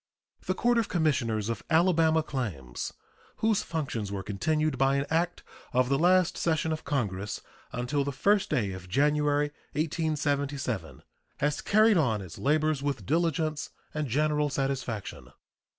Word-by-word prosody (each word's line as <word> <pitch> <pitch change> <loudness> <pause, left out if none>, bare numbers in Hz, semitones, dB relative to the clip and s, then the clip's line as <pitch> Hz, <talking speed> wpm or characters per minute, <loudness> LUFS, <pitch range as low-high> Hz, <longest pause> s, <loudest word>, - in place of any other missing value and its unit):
The - - +1
Court 240 0 +3
of 225 - -1
Commissioners 125 - +1
of 115 - -3
Alabama 160 -1 +4
Claims, 95 - -4 0.4
whose 220 -2 +2
functions 130 - -3
were 100 -1 -3
continued 150 +8 0
by 135 0 +3
an 140 0 0
act 170 +2 0 0.3
of 125 0 +3
the 135 0 +2
last 180 +1 +3
session 160 -1 +1
of 155 - -3
Congress 105 -8 -2 0.3
until 125 +4 -1
the 140 - -2
1st 200 +9 +2
day 105 -6 0
of 95 -1 -8
January, 145 +3 +2 0.2
1877, 145 - -1 0.3
has 145 +1 0
carried 215 0 +4
on 120 -9 +2
its 90 - -10
labors 155 0 +2
with 140 -2 -2
diligence 155 -1 0 0.2
and 150 -1 -2
general 150 +3 +1
satisfaction. 135 -6 -3
145 Hz, 140 wpm, -28 LUFS, 125-160 Hz, 0.4 s, Alabama